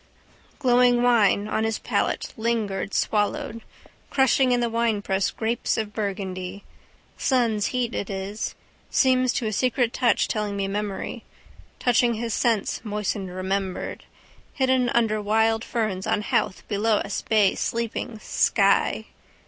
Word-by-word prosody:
Glowing 245 -2 +4
wine 215 -4 +4
on 220 - 0
his 225 -1 0
palate - - -1
lingered 220 -4 -1
swallowed. 215 +2 -1 0.5
Crushing 265 -1 +3
in 245 - +3
the 240 - +1
winepress 215 -4 0
grapes 225 +1 -1
of 215 -2 -3
Burgundy. 195 -2 -4 0.6
Sun's 230 -6 +1
heat 245 -2 -1
it 200 - -3
is. 195 +2 -4 0.3
Seems 255 -2 +3
to 250 - -1
a 215 - -1
secret 245 +1 +1
touch 245 -2 +2
telling 210 -2 -2
me 195 -1 -1
memory. 205 0 -4 0.5
Touched 245 -2 +3
his 235 -2 0
sense 230 -4 0
moistened 210 -2 -3
remembered. 190 +1 -3 0.5
Hidden 260 -2 +2
under 220 -3 +1
wild 220 +2 +2
ferns 215 -7 -2
on 210 - +1
Howth 185 -4 -1
below 215 +1 +1
us 200 -1 -3
bay 210 -3 +3
sleeping: 230 0 -3
sky. 200 +1 +2
220 Hz, 130 wpm, -24 LUFS, 200-240 Hz, 0.6 s, Glowing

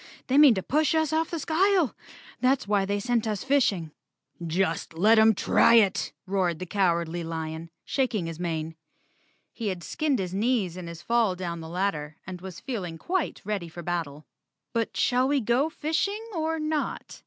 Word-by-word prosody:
They 270 +2 +3
mean 285 -6 +8
to 190 - -2
push 310 +3 +1
us 315 -1 +1
off 320 +1 +1
the 335 - -3
skyle. 345 +1 +2 0.4
That's 255 -2 +2
why 200 -2 +2
they 200 +1 -1
sent 235 +1 0
us 210 -2 -2
fishing." 220 - +1 0.5
"Just 165 -1 -1
let 215 +6 +5
'em 220 0 +6
try 230 - +4
it!" 205 -5 +3
roared 185 -4 0
the 185 - -5
Cowardly 170 -3 0
Lion, 160 0 -5 0.2
shaking 245 -9 0
his 165 0 -6
mane. 165 -2 -3 0.8
He 230 - -4
had 185 -3 -3
skinned 305 -4 0
his 185 -3 -3
knees 205 -4 0
in 180 -2 -7
his 170 0 -9
fall 230 -5 +2
down 175 -2 -4
the 160 0 -8
ladder 165 -5 -2
and 180 -1 -7
was 185 -3 -8
feeling 185 -10 -5
quite 360 - -2
ready 200 -5 -3
for 175 +2 -8
a - - -12
battle. 160 -4 -3 0.5
"But 230 -1 -1
shall 255 +1 +2
we 285 0 +2
go 245 +6 +1
fishing 400 +9 -2
or 320 -1 -1
not?" 305 -1 -3
200 Hz, 180 wpm, -27 LUFS, 170-270 Hz, 0.8 s, mean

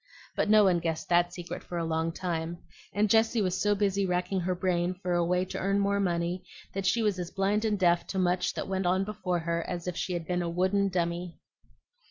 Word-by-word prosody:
But - - 0
no 215 0 +7
one 180 -3 +4
guessed 165 -1 -3
that 175 0 +3
secret 175 -1 -7
for 175 - -6
a 165 - -1
long 160 0 0
time; 170 -1 -3 0.3
and 210 +1 +2
Jessie 225 +1 +3
was 185 -1 -1
so 205 0 +3
busy 200 -1 +1
racking 180 +1 0
her 180 +1 -1
brain 180 0 0
for 180 -1 -3
a 175 0 +2
way 180 +2 +1
to - - -5
earn 195 +1 +1
more 200 0 +1
money 175 -1 -1 0.3
that 195 -1 -2
she 230 +4 +2
was 205 -4 +1
as 175 -1 -4
blind 205 +3 0
and 210 -2 +1
deaf 175 -2 +2
to 195 - -4
much 180 0 +1
that - - -3
went 190 -1 -1
on 185 +2 +2
before 185 -3 -2
her 170 0 -1
as 175 -1 -4
if 180 - -2
she 180 - -2
had 170 -2 -3
been 180 +1 -1
a 170 - -2
wooden 190 +3 +1
dummy. 175 -1 -2
180 Hz, 235 wpm, -29 LUFS, 175-195 Hz, 0.3 s, no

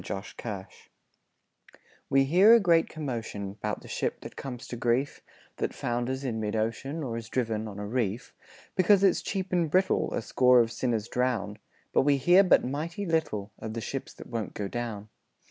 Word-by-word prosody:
0 95 - -3
Autoplay 100 -1 -7 1.4
We 135 0 +4
hear 185 +11 +7
a - - +6
great 170 -5 +3
commotion 115 -9 -5
'Bout 105 -1 -2
the - - -12
ship - - -2
that - - -9
comes 125 -3 -7
to - - -4
grief, 120 +4 0 0.4
That - - -2
founders 120 +3 -2
in 120 -4 -2
mid 105 0 -2
ocean, 135 +8 -2
Or 115 -4 -3
is 115 -1 -7
driven 110 -3 -1
on 100 -2 -8
a 105 - -4
reef; 115 +1 -2 0.4
Because 195 +1 +4
it's 195 - +4
cheap 190 -2 -3
and 170 -3 +2
brittle 185 +4 +2
A - - -2
score 125 +1 +5
of 115 -1 +2
sinners 115 -3 -1
drown. 115 -5 -1 0.3
But - - +5
we 140 0 +3
hear 175 +8 +6
but 185 - +4
mighty 160 +9 -3
little 135 - -1
Of 110 0 -6
the 115 - -3
ships 135 +3 -5
that - - -10
won't 115 -3 -5
go 100 - -3
down. 110 -2 -5
125 Hz, 185 wpm, -28 LUFS, 110-155 Hz, 1.4 s, hear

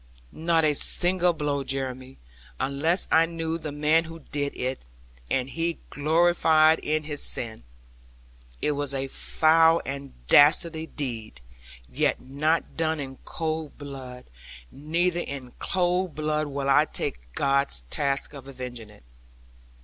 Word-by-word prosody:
'Not 165 0 +1
a 150 - +3
single 180 +4 +2
blow, 145 -3 -2
Jeremy; 130 -1 -4 0.4
unless 160 +7 +2
I 165 +1 +5
knew 165 0 -3
the 155 -2 -5
man 150 +3 +2
who 165 0 -9
did 145 -1 -2
it, 130 +1 -2 0.5
and 130 -1 0
he 165 +4 -2
gloried 160 0 +4
in 155 +1 -1
his 150 -1 -1
sin. 110 - +1 1.0
It - - +2
was 145 -1 -2
a 135 0 -3
foul 160 +3 +3
and 140 0 -6
dastard 160 - +4
deed, 115 - -5 0.5
yet - - 0
not 150 +5 -1
done 160 -1 0
in 135 -2 -6
cold 160 -2 -4
blood; 130 -3 -9 0.5
neither 170 +5 -1
in 135 -6 -6
cold 180 -1 0
blood 155 0 -1
will 140 -1 -3
I 145 +2 +5
take - - -5
God's 140 - +2
task 140 0 0
of 135 -2 -10
avenging 125 -4 -8
it.' 105 -11 -18
150 Hz, 135 wpm, -26 LUFS, 135-160 Hz, 1.0 s, I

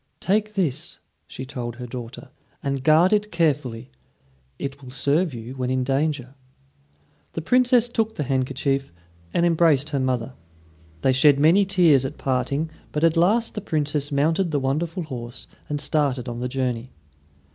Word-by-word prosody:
"Take 210 +2 0
this," 170 -10 -1 0.3
she 130 - -7
told 125 -4 -5
her 125 0 -7
daughter, 125 +2 -8 0.3
"and 140 -1 -2
guard 160 +6 +5
it 210 0 +1
carefully. 140 - -1 0.7
It 140 0 -5
will 130 - -11
serve 145 +6 +1
you 120 0 -7
when 130 -1 -3
in 130 0 0
danger." 135 -1 -1 1.0
The 165 - -3
Princess 245 +5 +4
took 225 -2 -1
the 150 - -2
handkerchief, 135 0 -1 0.4
and 170 - +2
embraced 160 -4 +3
her 140 - 0
mother. 130 -1 -1 0.7
They 130 - +3
shed 140 +2 +5
many 170 +7 +5
tears 175 -8 +4
at 135 - -5
parting, 140 +4 -1 0.2
but 150 - -2
at 165 0 +4
last 210 +8 +3
the 210 - -4
Princess 150 -5 -1
mounted 160 +6 +1
the 150 -2 0
wonderful 160 +7 -1
horse 125 -5 -7 0.2
and 145 0 -2
started 140 -4 0
on 120 0 -4
the 125 +1 -2
journey. 125 -2 -2
140 Hz, 155 wpm, -23 LUFS, 130-165 Hz, 1.0 s, guard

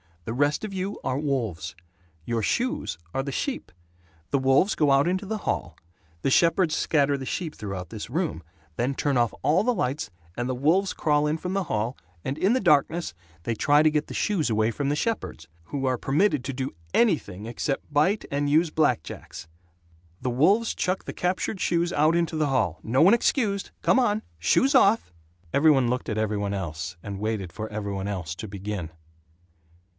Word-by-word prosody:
The 115 - -3
rest 145 - +1
of 210 -2 -4
you 190 +2 -3
are 130 - -1
wolves. 110 - -2 0.5
Your 115 -1 -1
shoes 250 - -1 0.2
are 135 - 0
the 140 +1 -4
sheep. 260 - -3 0.6
The 140 - +2
wolves 135 +9 +3
go 150 -3 +3
out 135 +3 +4
into 185 +3 0
the 215 +2 -3
hall. 85 - -3 0.5
The 135 - +2
shepherds 170 +1 +3
scatter 145 -3 +2
the 135 - -6
sheep 160 +3 -3
through 95 -3 -5
this 110 0 -7
room, 160 - -2 0.4
then 130 +3 0
turn 140 -2 0
off 120 -1 +2
all 165 +6 +3
the 250 +2 +2
lights, 140 - -2 0.3
and 120 0 -2
the 130 - -1
wolves 170 +9 +2
crawl 150 -1 +2
in 155 +2 0
from 180 +3 -4
the 195 -1 0
hall 110 0 -2 0.3
and 135 +2 -3
in 195 +7 +3
the 260 - +2
darkness 165 - +2 0.3
they 115 - -1
try 145 +6 +4
to 155 - +4
get 150 0 0
the - - -7
shoes 185 -10 0
away 110 +1 +2
from 140 +4 -2
the 145 - +1
shepherds 150 - -3 0.2
who 135 - -3
are 130 -1 +1
permitted 150 - +1
to 135 - -3
do 130 +1 -4 0.2
anything 110 - +1
except 135 +6 -3
bite 180 +9 +2
and 145 0 0
use 155 +2 +3
black 150 - +2
jacks. - - -9 0.7
The 125 - -1
wolves 195 - +3
chuck 185 +1 -1
the - - -5
captured 185 +2 -1
shoes 170 0 +1
out 155 +3 +3
into 170 -1 0
the 155 -1 +2
hall. 105 - 0
No 125 +4 +2
one 185 +6 +7
excused! 215 -4 +1
Come - - +4
on! 215 -3 +1 0.2
Shoes 265 - +3
off!" 220 - +4 0.4
Every 155 +3 +5
one 130 -4 +3
looked 125 +1 -2
at 110 - -2
every 110 -1 0
one 100 0 -2
else 85 -2 -4
and 100 -2 -6
waited 105 -4 -3
for 110 0 -5
every 105 -1 -4
one 95 0 -3
else 90 -6 -3
to 110 - -7
begin. 100 -3 -5
140 Hz, 195 wpm, -26 LUFS, 110-175 Hz, 0.7 s, one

